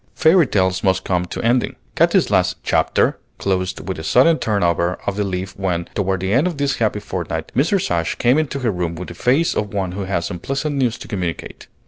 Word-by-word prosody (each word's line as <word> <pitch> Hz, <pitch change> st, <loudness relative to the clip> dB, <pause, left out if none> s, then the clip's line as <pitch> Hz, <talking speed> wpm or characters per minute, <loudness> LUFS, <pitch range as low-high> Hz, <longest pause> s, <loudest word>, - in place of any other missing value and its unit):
Fairy 165 Hz, -1 st, +5 dB
tales 95 Hz, -3 st, +1 dB
must 95 Hz, -1 st, +2 dB
come 90 Hz, -1 st, 0 dB
to -, -, -6 dB
ending. 120 Hz, +2 st, +1 dB, 0.2 s
Katy's -, -, +3 dB
last -, -, +2 dB
chapter -, -, +1 dB, 0.2 s
closed 95 Hz, -1 st, -2 dB
with 95 Hz, -4 st, -3 dB
a -, -, -6 dB
sudden 155 Hz, -, +4 dB
turn 105 Hz, -3 st, 0 dB
over 85 Hz, +1 st, +1 dB
of 100 Hz, -, -1 dB
the 105 Hz, -, 0 dB
leaf 95 Hz, 0 st, -4 dB
when, 90 Hz, -3 st, -1 dB
toward 95 Hz, -2 st, -1 dB
the 95 Hz, +2 st, 0 dB
end 140 Hz, +8 st, +3 dB
of 175 Hz, -5 st, -4 dB
this 140 Hz, 0 st, 0 dB
happy 110 Hz, -2 st, 0 dB
fortnight, 85 Hz, -5 st, -4 dB
Mrs. 165 Hz, -, +1 dB
Ashe 85 Hz, -1 st, 0 dB
came 125 Hz, +5 st, +3 dB
into 145 Hz, -3 st, -2 dB
her 120 Hz, -3 st, +1 dB
room 90 Hz, -3 st, -3 dB
with 90 Hz, +2 st, -7 dB
the -, -, -7 dB
face 135 Hz, -, +2 dB
of 105 Hz, -1 st, -3 dB
one 95 Hz, -3 st, -1 dB
who 95 Hz, +1 st, -4 dB
has 90 Hz, -3 st, -2 dB
unpleasant 135 Hz, -, -3 dB
news 125 Hz, -3 st, +1 dB
to -, -, -10 dB
communicate. 90 Hz, -6 st, -5 dB
95 Hz, 215 wpm, -20 LUFS, 90-125 Hz, 0.2 s, Fairy